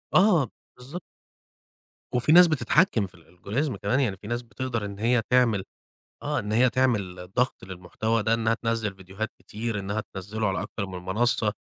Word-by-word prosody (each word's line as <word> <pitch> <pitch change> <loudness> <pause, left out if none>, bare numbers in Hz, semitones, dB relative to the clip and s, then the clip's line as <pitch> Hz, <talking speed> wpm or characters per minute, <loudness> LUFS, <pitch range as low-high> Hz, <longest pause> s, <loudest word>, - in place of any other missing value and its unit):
آه 180 - +5 0.3
بالضبط. 145 +8 -8 1.1
وفي 125 +5 +2
ناس 180 +1 +9
بتتحكّم 150 - +2
في 90 -1 -19
الAlgorithm 100 - -3
كمان، 130 - 0
يعني 105 -8 0
في 105 - -11
ناس 120 +1 -2
بتقدر 120 -2 -4
إن 100 0 -7
هي 120 +1 +3
تعمل 120 -6 +3 0.6
آه، 150 0 -1
إن 105 -3 -3
هي 125 +3 +4
تعمل 100 -9 0
ضَغْط 125 -4 0
للمحتوى 95 +5 -2
ده 110 +2 +2
إنّها 115 0 +1
تنزّل 115 -3 -1
فيديوهات 95 +3 -6
كتير 110 0 -4
إنّها 100 +2 -2
تنزّله 105 +3 -2
على 95 - -1
أكتر 100 - -4
من 95 -1 -7
منصة، 110 +2 +1
110 Hz, 165 wpm, -26 LUFS, 100-125 Hz, 1.1 s, ناس